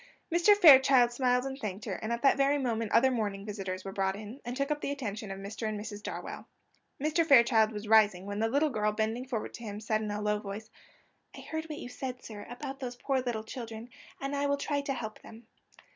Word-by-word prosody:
Mr. 375 +4 +6
Fairchild 265 -8 +7
smiled 250 0 +2
and 270 0 -5
thanked 205 -3 -5
her, - - -3
and 220 - -4
at 235 +2 -2
that 275 - +6
very 275 +1 +3
moment 230 -5 -1
other 260 +3 +5
morning 205 -5 -2
visitors 195 -3 -5
were 195 - -4
brought 190 -1 0
in, 215 +6 -9
and 245 +1 -5
took 275 +1 -1
up 295 0 -1
the - - -2
attention 220 -7 -4
of 195 - -5
Mr. 210 +3 -4
and 215 -1 -4
Mrs. 210 -1 -7
Darwell. - - -6 0.5
Mr. 310 +4 +2
Fairchild 235 -7 +5
was 210 0 -6
rising, 210 -4 +4
when 205 +1 -4
the 225 +1 +1
little 285 +4 +2
girl, 210 -2 +1
bending 220 +4 -2
forward 235 -4 -4
to 235 - -9
him, 210 -2 -5
said 215 0 -1
in 215 - -3
a 205 0 -3
low 210 0 0
voice: 210 +2 -7 0.7
"I - - -8
heard 315 0 -5
what 310 -2 -6
you - - -7
said, 250 0 -6
sir, 210 -2 -9
about 270 +2 -6
those 250 -2 -5
poor 265 +1 -1
little 240 -3 -3
children, 230 0 -7 0.3
and 275 +1 -3
I 285 0 0
will 285 0 +1
try 285 0 -1
to 280 -1 -2
help 220 -3 -6
them." 225 +1 -13
230 Hz, 235 wpm, -30 LUFS, 210-270 Hz, 0.7 s, Fairchild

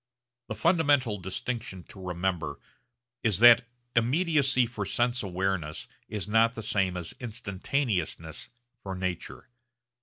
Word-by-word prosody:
The - - -4
fundamental 145 - +3
distinction 95 +1 -4
to 95 - -11
remember 90 -1 -2 0.6
is 110 -5 +1
that 120 +2 +8 0.3
immediacy 135 +1 +3
for 115 -3 -4
sense 120 +5 0
awareness 95 -5 -2 0.2
is 105 -3 -3
not 115 +3 +3
the 110 - -6
same 95 -3 0
as 85 -2 -3
instantaneousness 100 - -2 0.3
for 95 -1 -5
nature. 90 -2 -4
105 Hz, 115 wpm, -28 LUFS, 95-125 Hz, 0.6 s, that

